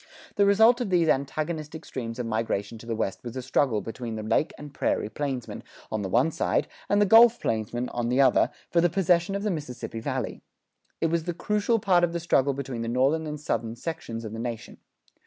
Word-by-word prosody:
The 200 -1 +4
result 220 +5 +5
of 235 - -1
these 175 -3 +3
antagonistic 155 +2 -2
streams 115 -3 -5
of 125 - -3
migration 110 -1 -2
to 115 - -12
the 115 - -1
West 100 -3 -3
was 120 -1 -7
a 130 - -3
struggle 125 -4 +1
between 115 0 -6
the 110 - -5
Lake 110 +7 +1
and 145 -1 -10
Prairie 105 - -1
plainsmen, 130 +1 -4 0.3
on 110 - -1
the 95 - -3
one 125 - +3
side, 165 - 0 0.2
and 205 - +3
the 205 - +5
Gulf 230 +3 +7
plainsmen, 115 +3 -2
on 120 -1 -2
the 125 +2 +1
other, 130 -2 +5 0.2
for 170 - +4
the 175 - +3
possession 175 +1 +2
of 200 - -3
the 210 - 0
Mississippi 135 -8 -5
Valley. 110 - -3 0.6
It 165 - +1
was 165 -1 0
the 175 -1 -3
crucial 210 +5 +1
part 185 -4 +3
of 170 -1 +1
the 170 - -1
struggle 140 -5 +2
between 135 -4 -4
the 115 - -3
Northern 135 +7 +1
and 150 0 -5
Southern 115 -5 -2
sections 115 -5 -5
of 110 - -6
the 115 - -5
nation. 115 -1 -6
140 Hz, 215 wpm, -26 LUFS, 115-170 Hz, 0.6 s, Gulf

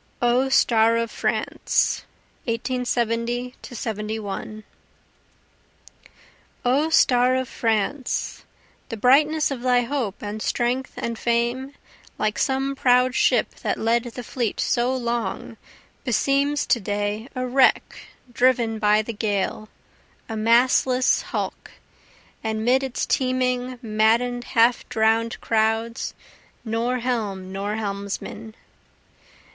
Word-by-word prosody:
O 245 +2 +2
Star 230 -3 +4
of 230 -1 -2
France - - 0 0.4
[1870 240 0 -1
71] 215 -2 -5 2.0
O 280 +6 +2
star 255 -4 +4
of 260 0 -1
France, 225 +5 -2 0.5
The 230 - -5
brightness 295 +6 +3
of 260 -3 -4
thy 250 -1 +3
hope 240 -6 -3
and 210 +1 -5
strength 250 +3 -1
and 230 -1 -4
fame, 240 +4 -1 0.4
Like 215 0 -1
some 270 +1 0
proud 250 -1 +3
ship - - +2
that - - -1
led 230 +2 +1
the 245 +1 -7
fleet 235 -1 -3
so 240 +1 +1
long, 235 -3 -3 0.5
Beseems 280 +3 +1
to 240 - +4
day 205 +2 -2
a 255 0 -2
wreck 260 +1 +2 0.3
driven 235 -3 +2
by 210 0 +3
the 230 - -5
gale, 210 0 -2 0.6
a 225 - -5
mastless 250 +3 +3
hulk, - - -4 0.7
And 220 0 -2
'mid 255 +2 +4
its 265 -2 -2
teeming 255 -1 0
madden'd 230 +3 +1
half 235 0 +2
drown'd 225 +1 +1
crowds, 225 +1 0 0.5
Nor 230 +3 -1
helm 210 -7 -3
nor 200 +2 -3
helmsman. 205 +1 -5
235 Hz, 110 wpm, -23 LUFS, 220-255 Hz, 2.0 s, Star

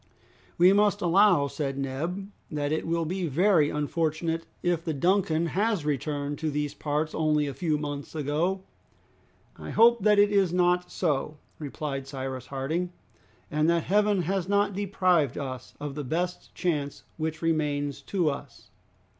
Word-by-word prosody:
"We 180 +2 +6
must 205 0 +3
allow," 180 -3 +5
said 140 -1 -3
Neb, 165 +9 -3 0.2
"that 145 -1 -2
it 155 - -1
will 165 0 0
be 180 +2 -2
very 160 0 +3
unfortunate 160 +2 -1 0.2
if 175 -2 +1
the 160 -3 -2
'Duncan' 170 0 +2
has 205 -4 +1
returned 145 0 -2
to 160 0 -1
these 150 0 -2
parts 150 +1 -2
only 150 -1 +2
a 140 - -4
few 155 +2 0
months 145 0 -5
ago!" 160 +6 -1 1.0
"I - - -7
hope 235 0 +5
that 210 +1 +4
it 205 0 +5
is 195 -4 +3
not 180 0 +2
so," 150 -3 -1 0.2
replied 140 -2 -4
Cyrus 130 -2 -5
Harding, 155 +7 -2 0.6
"and 155 +2 +2
that 170 -1 +2
Heaven 205 -1 +2
has 190 +1 -1
not 200 0 +2
deprived 185 -7 +1
us 130 -3 -6
of 145 -1 -5
the 150 +1 -4
best 175 +7 -3
chance 150 -5 -2
which 160 0 -3
remains 145 -3 0
to 180 -5 -1
us." 140 -3 -10
160 Hz, 155 wpm, -27 LUFS, 145-180 Hz, 1.0 s, We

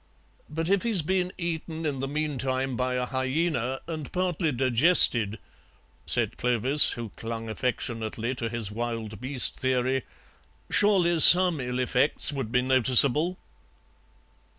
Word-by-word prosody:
"But 160 +2 -5
if 195 +1 0
he's 220 -8 -1
been 180 +2 -2
eaten 165 -1 -6
in 140 -3 -4
the 135 - -4
meantime 135 -3 -3
by 125 +1 -3
a 125 0 -3
hyaena 130 0 -3
and 155 -3 -8
partly 180 -3 -3
digested," 120 - +4 0.7
said - - +1
Clovis, 125 +4 +4
who 120 -3 -8
clung 115 +2 -8
affectionately 115 -1 -4
to 115 -3 -5
his 115 -3 -4
wild 115 -1 -7
beast 130 0 -2
theory, 130 0 -2 0.7
"surely 180 -5 +2
some 175 0 +8
ill 125 -1 -5
effects 130 +4 +1
would 135 -6 -6
be 125 +1 0
noticeable?" 130 +6 +2
130 Hz, 125 wpm, -24 LUFS, 120-160 Hz, 0.7 s, some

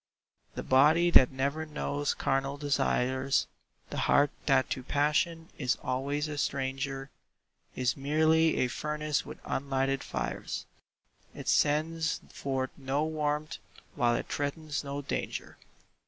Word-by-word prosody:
The - - -4
body 155 +6 +5
that 130 -6 +8
never 140 +4 -1
knows 145 -2 -2
carnal 135 +1 0
desires, 135 -1 +1 0.5
The - - -3
heart 145 0 +5 0.2
that 135 -3 +4
to 130 - -1
passion 150 +5 0
is 125 -3 +1
always 140 +4 -1
a 150 -1 -4
stranger, 135 0 -2 0.6
Is 125 -1 +1
merely 155 +3 +3
a 125 - +3
furnace 150 +3 -2
with - - -8
unlighted 135 0 -1
fires; - - -4 0.7
It - - -8
sends 160 +2 +2
forth 130 -1 -2
no 140 +2 0
warmth 150 -1 -2 0.3
while 120 -1 +2
it - - -3
threatens 145 +1 -3
no 140 0 -4
danger. - - -4
140 Hz, 125 wpm, -30 LUFS, 135-150 Hz, 0.7 s, that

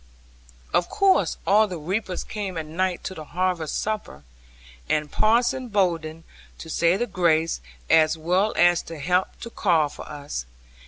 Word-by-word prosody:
Of 175 - +2
course 390 -2 +2
all 210 +2 +5
the 180 -3 -5
reapers 185 +4 -3
came 200 -4 -5
at 160 - -3
night 180 +3 -2
to - - -4
the 155 - -8
harvest 175 -1 -1
supper, 210 - -4 0.7
and 150 -1 0
Parson 240 +4 +2
Bowden 165 -6 -1 0.3
to 160 - -9
say 170 +3 +3
the 240 - 0
grace 165 - +1 0.3
as 160 0 +4
well 180 +6 +1
as 175 -1 +5
to 165 - -9
help 180 +6 0
to 235 - -7
carve 160 -10 +1
for - - -10
us. 140 - -6
175 Hz, 155 wpm, -24 LUFS, 160-200 Hz, 0.7 s, all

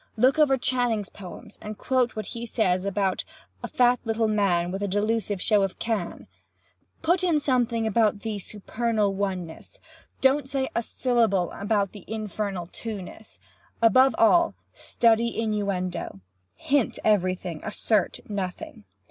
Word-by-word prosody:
Look 260 +6 +4
over 275 -3 +5
Channing's 245 -5 0
poems 205 +3 -11
and 215 0 -7
quote 255 -1 +1
what 215 -2 -4
he 235 +3 -6
says 185 -5 +1
about 195 -1 0 0.4
a - - -2
'fat 245 0 +3
little 225 -1 0
man 185 -5 +1
with 195 +2 -4
a 205 - 0
delusive 205 0 0
show 210 +2 +3
of 195 -1 -1
Can.' 220 -6 -3 0.8
Put 350 +3 +2
in 335 -4 +3
something 240 -5 +1
about 215 -1 +2
the 220 -2 -3
Supernal 215 +1 -1
Oneness. 185 -4 -4 0.4
Don't 270 +1 +3
say 265 -1 -1
a - - +2
syllable 225 -7 +1
about 200 -1 0
the 205 -4 -11
Infernal 210 -4 -3
Twoness. 215 +2 -8 0.4
Above 260 +4 +5
all, 340 +9 +4 0.2
study 230 0 +1
innuendo. 200 - -2 0.4
Hint 280 -4 0
everything—assert 185 +1 0
nothing. 210 - -5
215 Hz, 130 wpm, -26 LUFS, 195-235 Hz, 0.8 s, over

